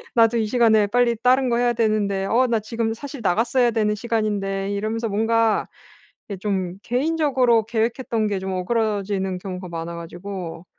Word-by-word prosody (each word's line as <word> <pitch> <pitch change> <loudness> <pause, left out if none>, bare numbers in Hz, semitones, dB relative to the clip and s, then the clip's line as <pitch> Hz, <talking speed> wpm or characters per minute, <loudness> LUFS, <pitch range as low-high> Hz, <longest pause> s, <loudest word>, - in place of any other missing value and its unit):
나도 230 0 +4
이 220 - +1
시간에 220 -3 +4
빨리 240 +2 +2
다른 255 +1 +3
거 235 - +1
해야 240 0 +2
되는데 210 -4 0
어 250 +5 +2
나 230 -2 +1
지금 225 +1 -2
사실 280 +1 -8
나갔어야 235 +6 +2
되는 210 -2 +1
시간인데' 205 -3 -2
이러면서 220 +3 -2
뭔가 225 +1 +1 0.6
이게 200 - -4
좀 190 -2 -2
개인적으로 255 -4 +2
계획했던 230 0 -1
게 200 -2 -1
좀 190 0 -4
어그러지는 195 -1 -1
경우가 185 -1 -6
많아 165 0 -5
가지고 175 0 -7
220 Hz, 360 characters per minute, -22 LUFS, 195-235 Hz, 0.6 s, 나도